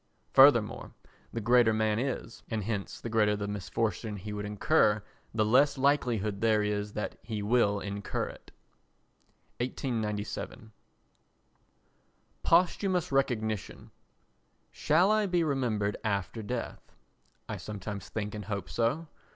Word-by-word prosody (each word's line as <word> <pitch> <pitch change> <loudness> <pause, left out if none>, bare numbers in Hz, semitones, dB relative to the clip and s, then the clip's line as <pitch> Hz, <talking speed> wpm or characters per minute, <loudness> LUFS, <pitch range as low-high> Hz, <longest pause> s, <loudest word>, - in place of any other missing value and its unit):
Fortunately 130 -6 +5 0.4
the 115 - -3
greater 120 0 +5
man 110 0 +1
he 130 - 0
is, 130 -3 -5
and 110 -2 -2
hence 105 -1 -3
the - - -6
greater 110 -2 +2
the 100 0 -3
misfortune 105 +1 -2
he 105 +2 -6
would 105 0 -4
incur, 105 0 +2 0.3
the 110 -1 +1
less 135 +6 +4
likelihood 120 -7 +1
there 110 -2 +3
is 105 0 -2
that 105 - -4
he 105 -1 -4
will 105 -2 +3
incur 100 0 -3
it. - - -13 1.1
[1897.] 110 -3 -3 1.7
Posthumous 180 0 +2
Recognition 110 -7 -1 0.8
Shall 175 +7 +3
I 215 -1 +3
be 175 -2 +2
remembered 120 -9 0
after 100 +1 -2
death? 115 +3 -5 0.6
I - - -4
sometimes 105 -1 -6
think 105 -1 -4
and 105 -2 -6
hope 100 -3 -4
so. 140 +8 0
110 Hz, 125 wpm, -30 LUFS, 105-125 Hz, 1.7 s, Fortunately